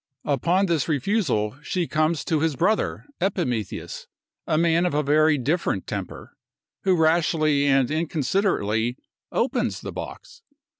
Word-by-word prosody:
Upon 170 +8 +2
this 165 -6 0
refusal, 140 - 0
she 175 +3 -1
comes 155 0 0
to 160 - +1
his 160 -1 0
brother 200 +10 0 0.2
Epimetheus, 150 - -2 0.4
a 155 - +1
man 170 +1 +3
of 170 - -2
a 150 - +2
very 150 +1 +4
different 140 - -1
temper, - - -6 0.5
who 185 -2 +3
rashly 155 -3 +2
and 135 -1 +3
inconsiderately 145 - 0 0.3
opens - - -1
the - - -6
box. 465 - -9
155 Hz, 130 wpm, -24 LUFS, 140-170 Hz, 0.5 s, very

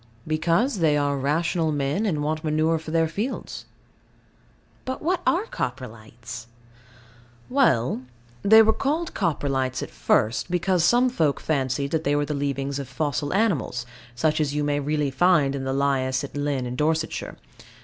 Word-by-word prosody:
Because 170 - +1
they 155 -3 +3
are 145 -1 +1
rational 160 +4 0
men, 145 +9 0
and 150 -6 -1
want 155 +2 -2
manure 155 +1 +1
for 160 - -9
their 165 0 +2
fields. 210 +11 -4 1.2
But 260 +2 -5
what 355 +2 0
are 365 +6 +2
Coprolites? 120 - -6 1.0
Well, 130 - +2 0.4
they 220 +2 +7
were 220 0 +3
called 310 +7 -1
Coprolites 135 -4 -1
at - - -8
first 115 +10 +1
because 180 0 +1
some 245 +8 +4
folk 155 - +1
fancied 140 -1 -1
they 155 -3 +1
were 145 0 +1
the 150 - -3
leavings 140 -1 -2
of 140 - -5
fossil 145 -2 -2
animals, 185 - 0 0.3
such 155 +4 +1
as 145 -1 -1
you 150 - 0
may 145 0 0
really 145 0 -1
find 145 -1 +3
in 135 -1 -4
the 135 - -1
lias 135 -1 0
at 140 - -8
Lynn 145 -3 -1
in 125 0 -4
Dorsetshire. 160 +3 -1
150 Hz, 155 wpm, -24 LUFS, 135-170 Hz, 1.2 s, they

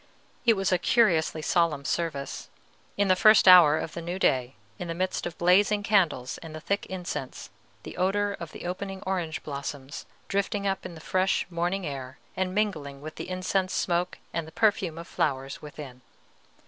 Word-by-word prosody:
It 230 - +6
was 195 -1 0
a 180 - +3
curiously 165 -7 +2
solemn 165 -6 +1
service, 150 -5 -3 0.5
in 200 0 +2
the 185 - +5
first 215 0 +6
hour 170 -5 +9
of 155 - -4
the 170 - -5
new 175 +2 -4
day, 130 -9 +1 0.2
in 175 - -4
the 165 - -4
midst 185 0 -1
of 175 - -8
blazing 205 +4 +3
candles 175 -12 +1
and 160 -1 -9
the - - -6
thick 200 +5 -2
incense, 180 -8 -6 0.3
the - - -8
odor 200 +3 +1
of 170 -4 -8
the - - -9
opening 190 +2 -5
orange 175 -4 -2
blooms 140 -1 -6 0.2
drifting 200 +1 -1
up 195 -1 -1
in 170 - -11
the 160 - -11
fresh 185 +4 +1
morning 175 +3 -1
air, 135 -2 -6 0.2
and 185 0 -2
mingling 155 -10 -1
with 155 +2 -8
the - - -7
incense 185 +1 -1
smoke 175 0 0 0.2
and 165 -2 -2
the - - -11
perfume 195 -6 +1
of 170 - -8
flowers 135 -2 -2
within. 145 -4 -10
175 Hz, 180 wpm, -27 LUFS, 155-195 Hz, 0.5 s, hour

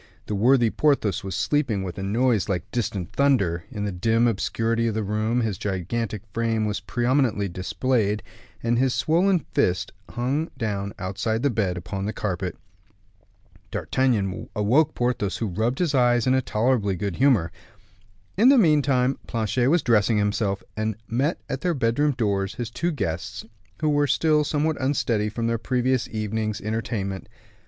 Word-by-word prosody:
The - - -4
worthy 120 +2 +4
Porthos 115 -8 +1
was 95 -2 -4
sleeping 130 -6 0
with 90 0 -6
a - - -3
noise 110 +2 +1
like 90 -3 -2
distant 105 -6 -2
thunder; 100 -13 +1
in 105 0 -4
the 100 - -2
dim 115 +6 +2
obscurity 115 +2 0
of 110 - -1
the 110 - -1
room 110 +4 0
his 110 -5 -2
gigantic 105 +2 -3
frame 115 -1 0
was 105 -1 -1
prominently 120 +2 +1
displayed, 105 +4 -1 0.4
and 120 0 +1
his 130 -1 +2
swollen 170 +7 +2
fist 90 0 +1 0.2
hung 135 +7 -1
down 100 -5 -2
outside 100 +5 -2
the 140 - +3
bed 100 -5 0
upon 95 +3 -4
the 110 - -2
carpet. 90 -3 -3 1.1
D'Artagnan 110 -8 -1
awoke 135 +10 +2
Porthos, 120 -5 -1
who 115 - -2
rubbed 110 +6 -1
his 170 -5 0
eyes 120 -2 +3
in 130 - +3
a 130 - +3
tolerably 110 -4 +1
good 100 0 -3
humor. 120 -12 +3 0.8
In 225 +7 +6
the 275 - +7
meantime 140 - +3
Planchet 115 +2 0
was 170 +2 +3
dressing 110 -2 +3
himself, 105 -1 0
and 110 -1 -1
met 135 +8 0
at 135 - -4
their 175 0 0
bedroom 135 +4 +1
doors 100 -4 0
his 120 -2 -5
two 170 +8 -1
guests, 95 - -4 0.4
who 155 - +2
were 145 -1 +2
still 150 +2 +3
somewhat 150 0 -1
unsteady 120 -6 +1
from 115 +2 -3
their 115 0 0
previous 125 0 0
evening's 110 -1 -2
entertainment. 105 -3 -3
115 Hz, 160 wpm, -24 LUFS, 100-130 Hz, 1.1 s, the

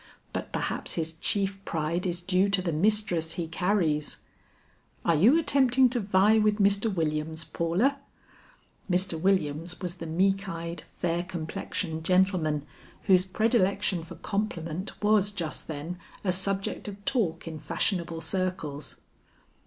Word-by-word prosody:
But - - -4
perhaps - - -1
his 165 -1 -2
chief 195 +3 -1
pride 165 +3 -1
is 175 0 -3
due 185 +2 +2
to 195 -1 +3
the 175 - 0
mistress 175 -2 +2
he 170 -2 -3
carries." 165 -3 0 0.9
"Are 170 - +4
you 215 - +6
attempting 265 -5 +4
to 245 0 -1
vie 200 +1 +4
with 210 -1 +3
Mr. 200 +1 +3
Williams, 160 -2 -1
Paula?" 190 +14 0 0.9
Mr. 180 -3 0
Williams 175 -3 +1
was 180 -3 -4
the 165 - -6
meek 195 +4 +1
eyed, 170 0 -5
fair 170 0 -1
complexioned 160 -1 -4
gentleman, 175 -5 +2 0.4
whose 185 -1 +4
predilection 200 -3 +1
for 165 - -10
compliment 185 -4 -3
was 210 -1 +4
just 175 -6 -5
then 160 +4 -5 0.2
a 190 - +2
subject 195 +3 -2
of 205 0 -8
talk 180 -11 0
in 160 -1 -6
fashionable 165 +2 -1
circles. 165 -4 -2
180 Hz, 135 wpm, -28 LUFS, 165-200 Hz, 0.9 s, you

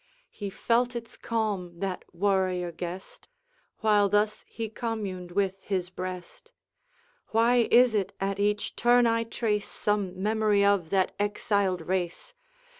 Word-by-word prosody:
He 205 -2 -5
felt 240 +5 +1
its 230 -1 -6
calm, 205 -7 -2
that 190 0 -3
warrior 185 -1 0
guest, 175 +2 -8 0.5
While 210 -2 +4
thus 210 +1 +1
he 225 -1 -5
communed 210 -6 -4
with 195 0 0
his 185 -2 -2
breast: 185 - -7 0.8
'Why 235 +1 +3
is 245 -1 +6
it, 200 -2 0
at 195 0 -2
each 210 0 0
turn 245 0 +4
I 230 0 +2
trace 220 -2 -2
Some 200 -3 -1
memory 210 -1 +3
of 200 -5 +2
that 190 -2 +1
exiled 205 -3 0
race? 185 - -3
205 Hz, 130 wpm, -28 LUFS, 185-225 Hz, 0.8 s, is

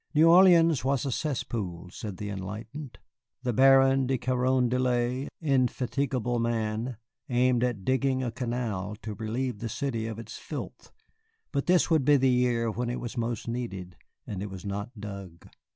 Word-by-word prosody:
New 155 +2 +6
Orleans 170 -3 +6
was 135 +1 +1
a 135 - -1
cesspool, 105 - -3
said 100 -1 -7
the 105 +1 -5
enlightened. 110 +8 -7 0.5
The 125 -2 0
Baron 135 +1 +5
de 130 0 +1
Carondelet, 125 0 +1
indefatigable 130 -3 0
man, 115 +1 -1 0.3
aimed 125 -1 +3
at 120 -6 -1
digging 130 0 +1
a 120 - -2
canal 115 -5 -3
to 110 - -4
relieve 115 +2 -3
the 115 - -4
city 115 -2 -2
of 110 -1 -5
its 110 -1 -8
filth, - - -7 0.6
but 140 -2 -1
this 180 -1 +3
would 160 -4 +4
be 145 +2 +5
the 130 -1 +3
year 120 -2 +2
when 120 +2 -2
it 120 - -3
was 120 0 -6
most 120 -2 -3
needed, 100 -7 -5 0.3
and 95 -3 -5
it 105 - -4
was 95 +1 -9
not 100 +4 -5
dug. 100 -5 -8
120 Hz, 160 wpm, -28 LUFS, 110-130 Hz, 0.6 s, New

